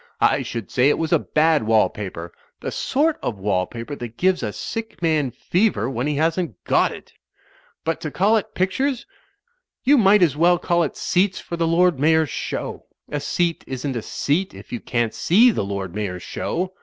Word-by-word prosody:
I - - +3
should 115 -5 -6
say 130 +3 +4
it - - +2
was 160 -1 -1
a - - +5
bad 155 0 +2
wall 110 0 +3
paper; 90 -4 -7 0.3
the - - -4
sort 300 +3 0
of 115 - -3
wall 95 -2 0
paper 120 +5 -7
that 120 -1 -8
gives 185 0 +2
a 105 - -2
sick 225 - -6
man 155 -5 +1
fever 175 - 0
when 125 +2 -2
he 150 - 0
hasn't 160 - 0
got - - +2
it - - -11 0.7
But 165 0 -2
to 155 - -3
call 200 +8 +2
it 210 - -5
pictures 255 +8 0 0.4
— 485 - -40
^you 285 0 +6
might 200 -2 +5
as 155 -5 +2
well 175 +3 +4
call 175 0 +1
it 155 - -2
seats 185 +1 +1
for 170 - -6
the 165 -1 0
Lord 170 -2 +3
Mayor's 160 +1 +3
Show. - - -5 0.2
A 145 - -2
seat 170 +4 -1
isn't 130 +1 -4
a 115 - -2
seat 165 - -1
if 100 +5 -12
you 120 - -2
can't 120 -2 -1
see 230 +8 +5
the 205 - -2
Lord 100 -2 -4
Mayor's 95 -4 -4
Show. 175 - -3
160 Hz, 200 wpm, -22 LUFS, 120-185 Hz, 0.7 s, ^you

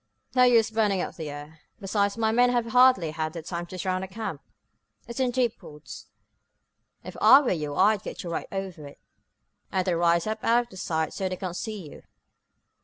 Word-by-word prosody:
"No 255 - +3
use 235 -3 +5
burning 210 -3 +1
up - - -3
the 160 -3 -6
air. 145 +2 -10 0.2
Besides, 200 0 -1
my 220 -1 +1
men 245 +2 +4
have 240 -1 +1
hardly 245 -8 +4
had 155 0 -3
time 175 -1 -5
to 185 - -8
surround 185 +1 -2
the - - -5
camp. 195 -6 -6 0.7
It's 235 +2 -7
in 260 -1 +2
deep 245 -2 -1
woods. 150 0 -11 1.0
If - - -9
I 275 - +9
were 270 - -1
you 150 -4 -3
I'd 205 +3 +3
get - - -7
right 170 -2 -4
over 190 -6 -6
it, 140 - -15 0.7
and 185 -1 0
then 180 -2 +1
rise 170 0 +2
up 215 0 -4
out 235 -1 +1
of 190 - -9
sight 160 -3 -2
so 190 -1 -2
they 185 - -3
can't 180 -2 -5
see 210 -4 -6
you. - - -12
190 Hz, 195 wpm, -26 LUFS, 170-225 Hz, 1.0 s, I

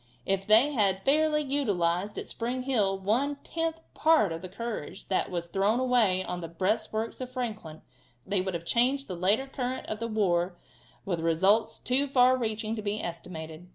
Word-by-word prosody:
If 195 0 -1
they 225 +7 +6
had 195 -5 +1
fairly 300 +2 +3
utilized 205 -9 0
at - - -5
Spring 245 +2 -3
Hill 210 -8 +1
one 235 +10 0
tenth 325 0 -2
part 310 - +4
of 165 - -5
the 185 - -7
courage 205 -3 -6
that 190 - 0
was 175 -2 -3
thrown 200 +6 +1
away 235 -8 +3
on 180 -1 -4
the 165 - -5
breastworks 215 +7 -2
of 255 - -4
Franklin 215 -11 -5 0.4
they 195 -1 0
would 190 -1 -3
have 170 0 -5
changed 260 +8 +1
the 185 - -4
later 200 +9 +2
current 260 -1 -4
of 215 - -5
the 230 - -2
war 180 -5 0 0.5
with 180 -4 -1
results 190 +7 +2
too 265 +4 +1
far 255 -1 +5
reaching 220 -2 -2
to 215 - -4
be 210 +1 -2
estimated. 165 -1 -7
215 Hz, 180 wpm, -28 LUFS, 185-255 Hz, 0.5 s, they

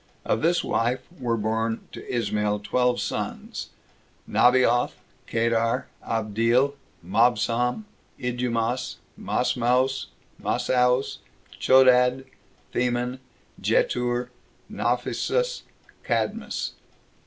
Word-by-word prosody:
Of 110 - +1
this 175 +2 +2
wife 125 +2 0 0.2
were 120 -3 0
born 110 +1 -1
to - - -9
Ismael 105 -3 0
twelve 125 +3 +1
sons; - - -4 0.6
Nabaioth, 125 -1 +4 0.3
Kedar, 115 0 +1 0.2
Abdeel, 115 +5 +1 0.3
Mabsam, 120 - +2 0.3
Idumas, 125 0 -1 0.2
Masmaos, 125 +2 +1 0.3
Masaos, 125 +1 +1 0.4
Chodad, 130 0 +5 0.5
Theman, 125 +1 0 0.4
Jetur, 120 0 +1 0.4
Naphesus, - - 0 0.4
Cadmas. - - -1
125 Hz, 75 wpm, -25 LUFS, 115-125 Hz, 0.6 s, Chodad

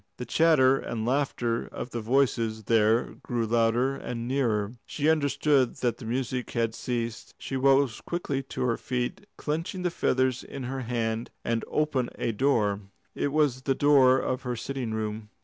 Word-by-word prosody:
The 125 - -5
chatter 135 -5 +4
and 110 -1 -4
laughter 120 -3 0
of 125 - -7
the 120 - -3
voices 115 -2 +1
there 110 +2 +3
grew 120 -2 -1
louder 120 +3 +2
and 120 -3 -5
nearer. 115 -6 0 0.2
She 150 0 -1
understood 145 -3 +2
that 120 -2 -1
the 120 - -9
music 125 +1 -2
had 115 -2 0
ceased. 115 -2 -4
She 135 - -5
rose 135 -2 +3
quickly 145 -6 -2
to 135 - -5
her 120 -2 +1
feet, 125 +10 -3
clenching 165 +4 -3
the 180 - +1
feathers 130 -5 +1
in 140 - -7
her 130 +2 -3
hand, 115 -1 -2 0.2
and 115 -1 0
opened 145 -5 0
a 115 - -1
door. 105 -4 +1 0.3
It - - -1
was 145 -4 +2
the 135 0 0
door 135 -3 +5
of 130 0 -1
her 125 -1 -3
sitting 125 0 -4
room. 110 0 -4
125 Hz, 165 wpm, -27 LUFS, 115-135 Hz, 0.3 s, door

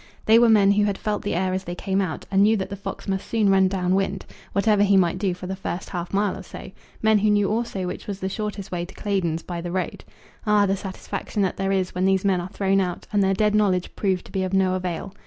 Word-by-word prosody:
They 225 +1 +6
were 235 -1 +5
men 205 -3 +5
who 205 +1 +3
had 200 -2 -1
felt 210 -1 -2
the 205 - -2
air 185 +1 0
as 190 0 -3
they 175 - -5
came 195 +1 -1
out, 180 -5 -4
and 195 0 +4
knew 215 +2 +5
that 190 0 -4
the - - -3
fox 200 - -7
must 190 -1 -2
soon 215 -4 +2
run 190 -1 +5
down 185 -1 0
wind, 195 0 -1 0.3
whatever 205 0 +2
he 200 -1 +5
might 175 -3 +2
do 190 -4 0
for 180 - -9
the 190 +1 -3
first 190 -1 -5
half 175 -2 -4
mile 200 0 +1
or - - -8
so, 190 0 -10 0.3
men 220 -1 +5
who 215 +1 +2
knew 205 -1 +2
also 220 -4 -2
which 180 - -6
was 200 -2 -4
the 190 - -2
shortest 205 0 -4
way 175 -1 -2
to 175 - -10
Claydon's 175 -6 -1
by 175 -1 -5
the 175 0 -5
road. 185 0 -3 0.4
Ah, 210 -1 +4
the 195 0 +1
satisfaction 195 +2 -4
that 190 - -1
there 195 0 -1
is 190 -2 0
when 180 +1 0
these 190 0 +2
men 185 -3 +2
are 175 - -6
thrown 195 0 +1
out, 180 -2 -3
and 205 - +3
their 190 0 +2
dead 210 +1 +2
knowledge 195 -4 +1
proved 190 -3 -1
to - - -14
be 190 - -1
of 185 0 -2
no 190 -1 +3
avail! 185 +1 -3
195 Hz, 270 wpm, -24 LUFS, 185-205 Hz, 0.4 s, They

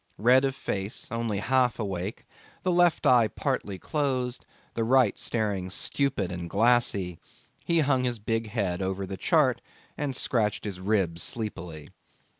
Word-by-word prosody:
Red 125 +6 +5
of 135 -1 -1
face, 100 -5 -4
only 115 -3 -1
half 125 +3 +2
awake, 95 -2 -4 0.4
the 185 - +1
left 175 -1 +3
eye 120 -3 +6
partly 100 -2 -3
closed, 130 - -2 0.3
the 115 - -1
right 125 -2 +4
staring 100 -5 -2
stupid 115 -1 -1
and 85 -1 -5
glassy, 100 -5 +2 0.4
he 170 -1 +2
hung 135 -3 +2
his 120 -1 0
big 115 +1 -2
head 100 -5 -1
over 95 +1 -2
the 95 +1 -5
chart - - +2 0.3
and 145 -3 -2
scratched 110 -5 +1
his 100 -3 -4
ribs 95 -4 0
sleepily. 85 -9 -4
110 Hz, 145 wpm, -27 LUFS, 95-125 Hz, 0.4 s, eye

